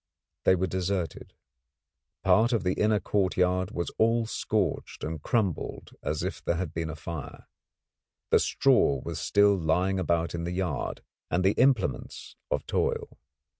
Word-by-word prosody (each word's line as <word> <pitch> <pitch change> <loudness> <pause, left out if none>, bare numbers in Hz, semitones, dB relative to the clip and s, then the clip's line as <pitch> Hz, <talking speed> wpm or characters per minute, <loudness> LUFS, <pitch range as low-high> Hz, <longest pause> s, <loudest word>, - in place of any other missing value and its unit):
They 95 - +6
were 95 +1 0
deserted. 95 -1 -3 0.9
Part 115 +3 +4
of 115 - +1
the 90 0 +1
inner 105 +1 +2
courtyard 95 -2 +1
was 85 -4 -3
all 115 +1 +3
scorched 105 -6 -2
and 80 -1 -4
crumbled 100 - -1
as 75 - -2
if - - -4
there 85 - 0
had 85 -2 -3
been 80 -1 -3
a 80 - -5
fire. 80 -2 -7 0.9
The - - +6
straw 70 -2 +3
was - - -4
still 100 0 +4
lying 90 +3 +1
about 85 -1 0
in 85 -1 -3
the 85 +1 -3
yard, 90 -5 -3 0.3
and 90 +2 +1
the 95 - +5
implements 120 - 0
of - - -1
toil. - - -1
90 Hz, 150 wpm, -28 LUFS, 85-100 Hz, 0.9 s, They